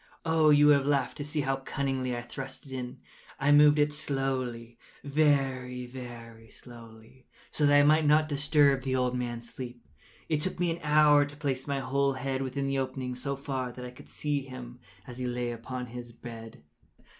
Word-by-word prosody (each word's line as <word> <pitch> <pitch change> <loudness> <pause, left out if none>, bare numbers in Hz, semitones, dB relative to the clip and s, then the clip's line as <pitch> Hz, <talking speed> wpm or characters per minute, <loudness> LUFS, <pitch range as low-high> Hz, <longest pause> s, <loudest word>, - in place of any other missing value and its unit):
Oh, 160 -1 +4
you 145 0 +6
would 145 -1 +7
have 135 - -2
laughed 140 -3 +1
to 145 - -4
see 150 +1 -2
how 135 -1 0
cunningly 135 -2 -2
I - - -3
thrust 135 +3 -7
it 135 - -12
in! 125 -1 -5 0.4
I 140 +2 +3
moved 150 0 +7
it 150 0 +2
slowly—very, 135 0 -1
very 120 -3 -10
slowly, 115 +1 -15 0.2
so 150 - +2
that 145 0 +6
I - - +6
might 155 +1 +4
not 155 +1 +4
disturb 145 -2 +3
the 130 0 -1
old 125 -1 +1
man’s 120 -1 -4
sleep. 120 -2 -8 0.4
It 155 -2 0
took 185 +2 -3
me 175 -1 +1
an 170 +1 -5
hour 150 -1 +5
to 145 +1 -11
place 135 -3 -2
my 140 -1 -1
whole 140 +1 +1
head 135 0 -3
within 135 +1 -2
the 135 0 0
opening 130 -1 -3
so 140 +3 -3
far 135 -2 -4
that 125 0 -8
I 125 - -7
could 125 - -15
see 145 -1 -2
him 125 -2 -9 0.3
as 125 0 -9
he 125 - -2
lay 120 0 -2
upon 125 +2 -5
his 120 0 -9
bed. 115 -5 -10
135 Hz, 190 wpm, -29 LUFS, 125-145 Hz, 0.4 s, would